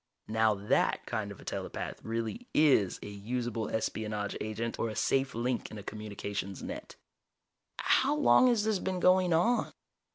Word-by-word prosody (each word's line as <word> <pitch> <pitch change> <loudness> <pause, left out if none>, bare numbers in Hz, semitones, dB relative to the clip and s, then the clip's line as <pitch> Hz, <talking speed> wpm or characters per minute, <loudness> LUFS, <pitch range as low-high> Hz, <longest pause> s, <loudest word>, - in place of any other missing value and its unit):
Now 110 0 +3
that 100 +1 +1
kind - - -3
of - - -10
a - - -13
telepath - - -5
really 115 - -3
is 135 - +4
a - - -6
usable 115 +2 -3
espionage 105 -2 -2
agent 110 +2 -3
or 115 - 0
a 110 - -6
safe 135 +2 +1
link 120 +1 -1
in 110 - -8
a 100 - -8
communications 100 -2 -5
net." 280 +4 -7 0.8
"How 280 +3 +3
long 285 -3 +6
has 235 -4 +3
this 215 -3 +1
been 185 0 -2
going 185 0 +4
on?" 225 +10 +2
115 Hz, 160 wpm, -31 LUFS, -, 0.8 s, long